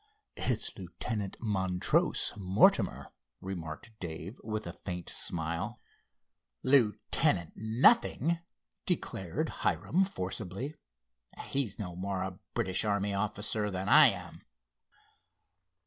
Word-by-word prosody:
"It's - - 0
Lieutenant 105 -4 -4
Montrose 95 -5 +2
Mortimer," 95 -1 +3 0.3
remarked 90 +2 -6
Dave 85 +5 -7
with 110 -1 -3
a 85 - -5
faint 90 -1 -6
smile. 85 0 -2 0.8
"Lieutenant 105 - +2
nothing!" 155 - +3 0.5
declared 95 - -2
Hiram 185 +4 +2
forcibly. 95 - -4 0.7
"He's 135 -7 -1
no 90 -5 -5
more 95 +1 -2
a 95 -1 -6 0.2
British 95 -6 0
army 100 -1 0
officer 105 +1 +1
than 95 0 -3
I - - +9
am." - - -4
100 Hz, 95 wpm, -31 LUFS, 90-110 Hz, 0.8 s, I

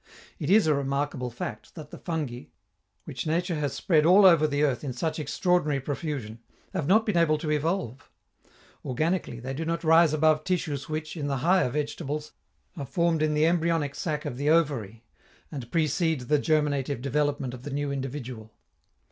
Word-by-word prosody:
It - - -3
is 210 0 +5
a 155 - +3
remarkable 140 -2 -2
fact 115 -2 -7
that 155 -3 -10
the - - -9
fungi, 150 -8 -4 0.6
which - - -6
nature 170 +3 0
has 145 -2 -2
spread 155 -5 +2
all 185 +5 +6
over 165 -4 +6
the 145 0 0
earth 140 -3 0
in 135 -3 -3
such 160 +6 -2
extraordinary 155 -2 +1
profusion, 135 -5 -4 0.3
have 165 -7 -2
not 220 +5 +4
been 210 -5 0
able 160 -2 +3
to 150 0 -3
evolve. 150 - -2 0.7
Organically 155 -1 -1
they 130 +3 -5
do 155 +4 -3
not 165 +1 -2
rise 165 0 +5
above 155 0 +3
tissues 155 -6 -2
which, 155 +1 -4
in 145 -3 -3
the 140 -1 -1
higher 180 -6 +4
vegetables, 150 +2 -4 0.4
are 145 - -5
formed 165 +3 0
in 155 -1 +1
the 150 +1 +3
embryonic 165 -4 +1
sac 150 -2 -3
of 120 - -4
the 145 +2 0
ovary, 130 -10 +1 0.5
and 130 -6 -7
precede 160 -1 +1
the 145 +4 +1
germinative 145 -4 0
development 140 -2 -1
of 125 - -9
the 145 - -7
new 145 0 -2
individual. 130 -5 -6
150 Hz, 175 wpm, -27 LUFS, 135-165 Hz, 0.7 s, all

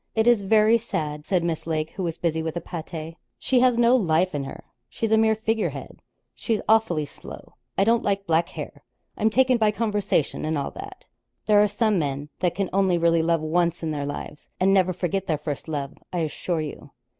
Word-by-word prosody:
'It 220 0 +2
is 240 -3 +5
very 215 +3 +4
sad,' 150 -9 -4
said 180 -3 +1
Miss 165 -1 -3
Lake, 155 -1 -1
who 195 - -6
was 170 -3 -2
busy 160 -2 -1
with 160 +1 -3
a - - 0
pâté. 165 -1 -7 0.2
'She 255 - +1
has 250 -1 +4
no 240 +1 +5
life 180 -5 +2
in 140 -2 -2
her; - - -9 0.3
she's 225 -1 -3
a - - +6
mere 220 0 +4
figurehead; 220 0 -3 0.3
she's 225 -3 -1
awfully 215 -9 +3
slow; - - -12 0.2
I 195 - +4
don't 230 +3 +3
like 200 -1 -1
black 170 -1 +1
hair; - - -8 0.3
I'm 220 - +2
taken 255 +2 +3
by 215 -1 +4
conversation 210 -8 -1
and 155 0 -1
all 140 - -3
that. - - -10 0.4
There 210 -1 +5
are 210 - +4
some 210 -1 +1
men 145 -1 -3
that 180 -2 0
can 195 -1 -2
only 190 -2 +3
really 170 -1 +3
love 165 0 +1
once 170 +2 0
in 160 - -1
their 145 -2 -3
lives, 145 +1 -7
and 195 +1 +4
never 185 -2 +3
forget 185 +2 -2
their 155 - +1
first 150 0 -5
love, 145 -3 -3 0.2
I 175 - -1
assure 160 +2 -2
you.' 150 -2 -7
180 Hz, 210 wpm, -24 LUFS, 160-215 Hz, 0.4 s, a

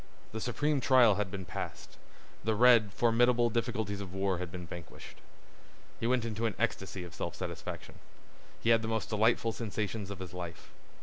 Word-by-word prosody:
The 110 - -5
supreme 145 +4 0
trial 125 -4 +6
had 100 - -2
been 95 -1 -6
passed. - - -6 0.5
The 110 0 +1
red, 115 -3 +6
formidable 120 +2 +3
difficulties 110 -3 -1
of 95 -1 -7
war 95 -2 0
had 90 -2 -5
been 90 0 -6
vanquished. 85 0 -10 0.8
He 115 - 0
went 125 -1 +2
into 115 0 -1
an 110 - -3
ecstasy 95 -4 -2
of 85 -2 -9
self - - -4
satisfaction. - - -6 0.6
He 115 - +2
had 115 -1 +5
the 110 - -3
most 110 -1 -1
delightful 115 +1 +2
sensations 105 -2 -3
of 100 - -5
his 90 -1 -8
life. 85 -2 -7
110 Hz, 175 wpm, -31 LUFS, 95-115 Hz, 0.8 s, trial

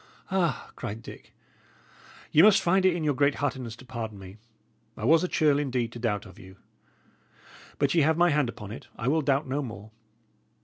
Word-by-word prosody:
"Ah," 175 -8 -1
cried 110 +3 -6
Dick, - - -12 1.0
"ye 155 - +6
must 200 +1 +7
find 190 +2 +3
it 180 - +2
in 170 - -3
your 150 -1 +2
great 140 +1 +2
heartedness 130 -5 -3
to 130 - -15
pardon 115 -4 -6
me! 95 +1 -11 0.6
I - - -4
was 165 +2 +5
a - - +1
churl, 150 -5 +2
indeed, 125 -5 -1
to 120 - -9
doubt 105 -4 -1
of 95 - -14
you. 95 +1 -14 1.2
But 140 -1 +1
ye 170 - +4
have 155 +2 +2
my 175 0 +4
hand 145 -4 +1
upon 105 -4 -8
it; 110 - -9
I 120 - -4
will 160 +4 +2
doubt 140 0 +1
no 135 +3 -1
more." 110 -4 -8
135 Hz, 200 wpm, -27 LUFS, 115-155 Hz, 1.2 s, must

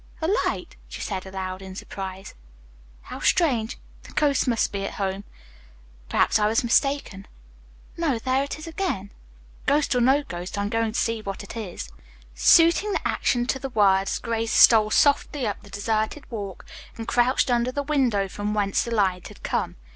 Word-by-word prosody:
"A 320 - -1 0.2
light," - - -5
she - - -8
said 190 -2 -4
aloud 190 0 -5
in 190 -1 -9
surprise. 190 -1 -7 0.7
"How - - -8
strange. 245 -10 +1 0.2
The - - -14
ghost 285 -3 +2
must 235 -3 +1
be 200 -1 -3
at - - -5
home. 195 0 -3 0.8
Perhaps - - +3
I 210 - +3
was 225 +3 +1
mistaken. 235 -5 0 0.7
No, 315 -7 0
there 260 +3 0
it 280 - -5
is 310 - -9
again. 325 - -3 0.6
Ghost 290 0 +2
or 250 - +2
no 270 +4 +4
ghost, 180 -6 -6
I'm 200 0 -1
going 225 0 0
to - - 0
see 230 -1 -1
what 200 -1 -6
it 200 - -10
is." 205 - -6 0.4
Suiting 335 - +5
the - - -1
action 240 -1 0
to 265 - -1
the 270 +1 -5
words, 195 -4 +3
Grace 230 -1 -2
stole 220 -2 +7
softly 285 +2 +2
up 205 -2 -3
the 205 - -15
deserted 215 +7 -2
walk 200 -5 -6 0.3
and 225 0 -6
crouched 250 +1 +2
under 240 +1 +1
the 285 +2 -2
window 255 -9 +1
from 205 +2 -3
whence 200 -2 +1
the - - -6
light 195 -5 0
had - - -15
come. - - -2
225 Hz, 175 wpm, -24 LUFS, 200-265 Hz, 0.8 s, stole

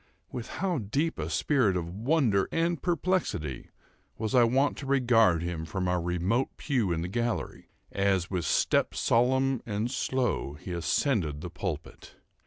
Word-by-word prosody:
With 120 -2 -5
how 180 -5 0
deep 135 - -1
a 80 +1 -3
spirit 100 - +2
of 85 0 -4
wonder 115 - +1
and 165 0 0
perplexity 175 - -1 0.5
was 110 -1 -3
I 125 -2 +6
wont 135 +5 +2
to 140 - -6
regard 115 -10 +4
him 85 -2 -3
from 90 +4 -3
our 90 -1 +1
remote 90 +9 0
pew 120 - 0
in 80 -1 0
the - - -3
gallery, 120 +4 -3 0.2
as, 95 -3 +1
with 90 -4 -2
step - - +2
solemn 130 +2 +2
and 110 +2 -2
slow, 130 - -1
he 80 +5 -8
ascended 85 - 0
the - - -6
pulpit! - - -6
110 Hz, 155 wpm, -28 LUFS, 90-135 Hz, 0.5 s, I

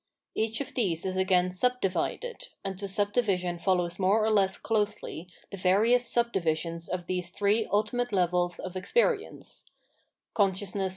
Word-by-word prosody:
Each 225 +3 -1
of 280 - -6
these 185 -9 0
is 185 0 -2
again 185 -1 +2
subdivided, 250 - -1 0.2
and 190 -1 -4
the 200 - -3
subdivision 195 -3 0
follows 175 -1 0
mows 185 -1 +2
or 220 +1 +2
less 195 -2 +3
closely 210 -6 -2 0.2
the 200 - -6
various 220 +7 +3
subdivisions 170 -8 0
of 180 -1 -3
these 180 -1 -2
three 205 +3 +1
ultimate 230 +4 0
levels 180 -2 +1
of 185 -1 -7
ex 185 0 -5
perience 480 -3 0 0.3
— - - -47
Consciousness. 195 -1 0
195 Hz, 150 wpm, -28 LUFS, 180-220 Hz, 0.3 s, less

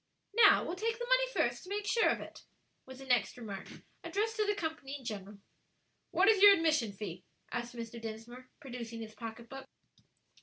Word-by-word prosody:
"Now, 465 - +7
we'll 345 - -3
take 450 +4 -1
the 485 - -4
money - - +3
first - - 0
to 365 - -12
make 410 +1 -2
sure 455 +1 +3
of - - 0
it," - - -10 0.5
was 260 0 -10
the 270 - -10
next 245 -3 +1
remark, 205 -5 -7 0.4
addressed 440 +2 -1
to 425 -1 +1
the 415 - +1
company 320 -7 -4
in 260 - -16
general. 205 -2 -6 0.7
"What 385 - +3
is 425 -3 +5
your 405 0 +11
admission 310 - +1
fee?" 190 -3 -7 0.3
asked 240 0 -4
Mr. 235 0 -7
Dinsmore, 230 +3 -8
producing 235 -4 -7
his 220 -1 -8
pocketbook. 235 +4 -8
255 Hz, 185 wpm, -33 LUFS, -, 0.7 s, your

